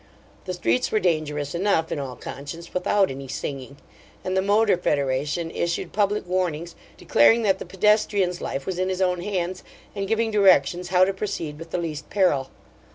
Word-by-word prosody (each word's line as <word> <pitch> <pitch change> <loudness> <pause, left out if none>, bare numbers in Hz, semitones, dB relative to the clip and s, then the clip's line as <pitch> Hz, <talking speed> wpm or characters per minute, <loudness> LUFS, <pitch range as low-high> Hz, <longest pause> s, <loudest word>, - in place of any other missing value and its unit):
The 185 -1 -3
streets 250 +7 0
were 215 - +2
dangerous 150 -5 -1
enough, 170 -2 +1
in - - -2
all 130 -3 -5
conscience, 145 +8 -8
without 195 0 +2
any 135 0 -7
singing! 135 0 -6 0.5
and 185 - -1
the 190 - +3
Motor 205 +1 +3
Federation 150 +1 -1
issued 170 0 -2
public 205 0 +1
warnings 175 -2 -2 0.2
declaring 230 0 +4
that 195 -3 +2
the - - -7
pedestrian's 200 -2 +2
life 135 0 -4
was 185 -1 -3
in 185 0 0
his 185 0 -2
own 180 -2 +1
hands, 185 -2 -3 0.3
and 195 -1 -3
giving 225 +1 +1
directions 180 -4 +4
how 185 0 +4
to 195 - -1
proceed 170 -7 -4
with 165 0 -9
the - - -2
least 155 -3 -5
peril. 150 -10 +2
180 Hz, 175 wpm, -24 LUFS, 150-195 Hz, 0.5 s, declaring